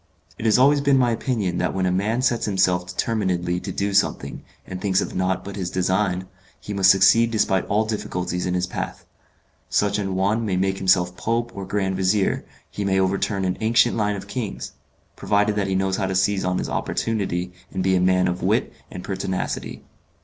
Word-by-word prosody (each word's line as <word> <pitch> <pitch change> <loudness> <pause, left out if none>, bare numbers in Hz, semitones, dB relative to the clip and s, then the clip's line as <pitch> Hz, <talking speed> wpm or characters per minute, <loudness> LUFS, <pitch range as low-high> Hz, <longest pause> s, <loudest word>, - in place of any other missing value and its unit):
It - - -5
has 110 0 +4
always 140 +3 +5
been 140 -1 +3
my 125 -2 +3
opinion 110 -7 -1
that - - -1
when 95 -1 0
a 90 - +1
man 110 +7 0
sets 120 -3 +1
himself 90 -3 +1
determinedly 90 -3 -1
to - - -6
do 100 0 -2
something, 100 +1 0 0.2
and 95 0 -7
thinks 95 -1 +2
of - - -3
nought 95 0 -1
but 100 - -7
his 95 -3 -3
design, 95 0 0 0.3
he 105 - -7
must 95 -1 +4
succeed 100 +5 +5
despite 105 -4 +1
all 105 +2 +1
difficulties 90 -5 -3
in 90 - -1
his 90 0 0
path: 90 - -6 0.6
such 105 0 +1
an 95 -2 -2
one 100 +5 +1
may 95 -4 -1
make 95 +1 0
himself 90 -1 +2
Pope 115 +4 -1
or 100 -1 -7
Grand 95 -1 -1
Vizier, 95 +1 +1 0.3
he 105 - -4
may 95 -1 +1
overturn 95 +1 0
an 90 - -2
ancient 115 +2 +3
line 105 -2 0
of 100 0 -8
kings 110 -1 -5 0.4
provided 105 0 +1
that 100 -2 0
he 95 - -1
knows 95 0 0
how 95 - -1
to 95 - -2
seize 95 +1 +1
on 90 0 0
his - - -2
opportunity, 90 -5 -2 0.2
and 95 -1 -2
be 95 0 +3
a 90 - +2
man 90 0 +3
of 90 0 -2
wit - - +1 0.2
and 90 - -8
pertinacity. 95 -1 -4
95 Hz, 200 wpm, -23 LUFS, 95-105 Hz, 0.6 s, always